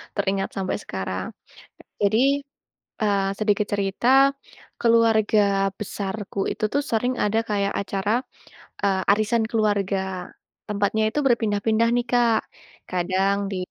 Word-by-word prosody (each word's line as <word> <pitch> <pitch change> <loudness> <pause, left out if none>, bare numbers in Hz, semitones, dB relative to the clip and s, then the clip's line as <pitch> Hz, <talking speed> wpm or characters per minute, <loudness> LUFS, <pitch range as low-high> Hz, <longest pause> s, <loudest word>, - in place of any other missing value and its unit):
teringat 195 -1 -1
sampe 190 -1 -2
sekarang. 95 -1 -4 0.7
Jadi, 260 +8 +3 0.6
eee, 200 -2 +2
sedikit 210 -1 +1
cerita, 200 +3 0 0.7
keluarga 215 -4 +3
besarku 200 -1 -5
itu - - -4
tuh 285 - +1
sering 245 +3 +1
ada 210 +2 +1
kayak 200 -1 0
acara, 200 +1 -2 0.7
eee, 195 -1 +1
arisan 215 +2 +1
keluarga. 205 -3 +1 0.7
Tempatnya 205 +1 0
itu 295 - -1
berpindah-pindah 225 -1 +2
nih, 245 - +1
Kak, 240 -2 +3 0.5
kadang 185 +2 +1
di, 195 - -3
205 Hz, 110 wpm, -23 LUFS, 195-225 Hz, 0.7 s, Jadi